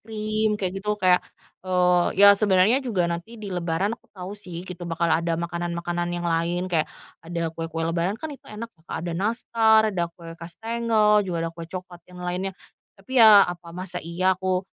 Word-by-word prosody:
cream 215 0 -1
kayak 185 -3 -2
gitu, 210 +1 -1
kayak, 185 -2 +4 0.4
eee, 180 -1 +2
ya 200 - +10
sebenarnya 200 +4 +3
juga 210 -9 0
nanti 170 +7 -4
di 205 -3 -7
lebaran 175 +4 -1
aku - - -32
tahu 185 +2 -6
sih, 180 -4 -8
gitu, 175 -2 -7
bakal 170 0 0
ada 165 0 +1
makanan-makanan 170 0 -3
yang 175 0 -4
lain. 170 +2 0
Kayak 165 -4 0 0.3
ada 165 0 -4
kue-kue 165 0 -4
lebaran 170 +5 -1
kan 305 +4 -6
itu 275 - -13
enak 230 +2 -8
ya, - - -26
Kak, - - -4
ada 170 - -3
nastar, 220 +3 +3
ada 170 -2 -1
kue 165 -1 -11
kastengel 220 +3 +1
juga 180 -4 -3
ada 165 - -3
kue 165 0 -9
coklat 180 -1 -8
yang 180 0 -10
lainnya. 185 +2 -3 0.4
Tapi 240 +6 0
ya, 210 -3 +9
apa 175 -1 -7
masa 180 -1 -5
iya 180 +3 +1
aku 185 0 -1
180 Hz, 185 wpm, -24 LUFS, 170-210 Hz, 0.4 s, ya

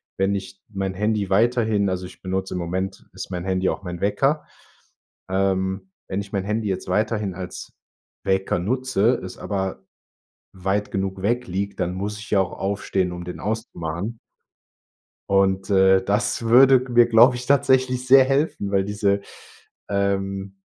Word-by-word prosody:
wenn 95 +1 +1
ich 100 0 -6
mein 95 -2 -3
Handy 105 0 -1
weiterhin 110 -1 +2
also 90 0 -3
ich - - -13
benutze 95 0 -3
im 90 - -2
Moment 95 +3 -4
ist - - -8
mein 90 -1 -3
Handy 95 0 0
auch - - -4
mein 90 -1 -6
Wecker. 135 +10 +1 0.8
Ähm, 95 0 -1 0.2
wenn 100 +1 -2
ich 100 - -11
mein 95 -1 0
Handy 105 0 -1
jetzt 95 - -3
weiterhin 105 0 0
als 90 -1 -8 0.5
Wecker 95 -2 0
nutze, 125 +2 +1
es 95 - -8
aber 95 -10 -3 0.7
weit 95 +2 -2
genug 95 -1 -3
weg 120 +3 0
liegt, 100 +2 -3
dann 90 0 -1
muss 105 +2 -4
ich 105 - -10
ja 100 - +4
auch 95 - -3
aufstehen, 95 -2 -1
um 90 0 -6
den 90 - -7
auszumachen. 105 -1 -4 1.1
Und, 95 0 +2
äh, 95 -1 +5
das 105 +4 0
würde 130 +2 +6
g 130 - -8
mir, 120 0 +7
glaube 120 +2 +6
ich, 125 0 -6
tatsächlich 130 -2 +2
sehr 135 0 +8
helfen, 135 -7 0
weil 95 -1 +2
diese, 100 -1 0 0.7
ähm 100 -1 -1
100 Hz, 160 wpm, -23 LUFS, 95-110 Hz, 1.1 s, sehr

